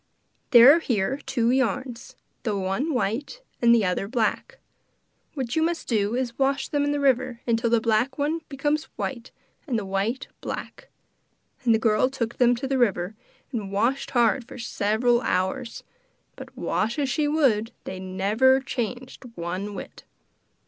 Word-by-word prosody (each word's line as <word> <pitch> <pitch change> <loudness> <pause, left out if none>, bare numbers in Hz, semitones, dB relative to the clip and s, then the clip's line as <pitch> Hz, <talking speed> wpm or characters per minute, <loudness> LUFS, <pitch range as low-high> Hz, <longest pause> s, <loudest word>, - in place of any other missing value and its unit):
There 250 +1 +9
are - - +2
here 240 -3 -1
two 240 -3 +1
yarns, 255 -1 -2 0.3
the 215 -5 -1
one 195 +11 -1
white, 265 - -2 0.2
the 235 -3 +4
other 180 +2 -1
black. 230 -1 -1 0.8
What 255 -4 -3
you 320 - +2
must 335 +1 -1
do 215 -1 +1
is 255 -1 -1
to 235 - -22
wash 275 +1 +1
them 290 -1 +1
in 290 - +1
the 290 - -1
river 255 -3 +1
till 230 +1 0
the 235 0 +4
black 230 +4 +1
one 305 +3 -1
becomes 295 +2 -1
white 245 -2 -4 0.4
and 250 -5 0
the 210 - -3
white 195 +6 -2
black.' - - -7 0.7
And 230 -2 +4
the - - +3
girl 220 +2 +2
took 240 -4 -4
them 245 -1 +5
to 255 +3 -4
the 265 -1 0
river 200 -4 +1 0.4
and 210 -6 -4
washed 235 +7 0
hard 240 +1 +2
for - - -10
several 235 +1 +1
hours, 230 +4 -2 0.5
but - - -11
wash 225 +5 -1
as 285 -2 0
she 295 +3 0
would 255 -8 +2
they 185 - -6
never 205 +8 +2
changed 250 0 -5
one 185 +4 -4
whit. - - -9
240 Hz, 165 wpm, -25 LUFS, 215-270 Hz, 0.8 s, There